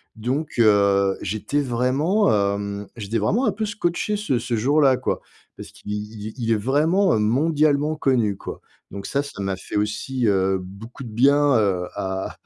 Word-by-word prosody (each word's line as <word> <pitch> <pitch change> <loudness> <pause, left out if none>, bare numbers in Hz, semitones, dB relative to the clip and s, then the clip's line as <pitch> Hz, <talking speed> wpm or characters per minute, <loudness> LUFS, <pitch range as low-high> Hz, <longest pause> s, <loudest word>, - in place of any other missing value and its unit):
donc 130 +8 -2
heu, 100 -3 +4
j'étais 110 +9 -2
vraiment, 140 - +1 0.2
hem, 100 0 -5
j'étais 110 +1 -3
vraiment 205 - +1
un - - +2
peu 220 - -2
scotché 205 0 -1
ce 200 -12 0
ce 120 0 -2
jour-là 135 +3 +3
quoi - - -2 0.4
parce - - -9
qu'il 105 - -9
il 105 +1 -6
il 115 -2 -1
est - - +4
vraiment, 155 - +2
heu, - - +2
mondialement 145 +5 +2
connu 125 -9 +1
quoi - - -7 0.3
donc 100 0 -7
ça 140 +7 -1
ça 140 -8 -8
m'a 95 -1 -1
fait - - -9
aussi, 105 +4 -1
heu, 95 -1 +2
beaucoup 100 +8 -10
de - - -8
bien, 140 +4 +4
heu, 95 -4 +1
à 95 -1 -4
115 Hz, 175 wpm, -22 LUFS, 100-145 Hz, 0.4 s, heu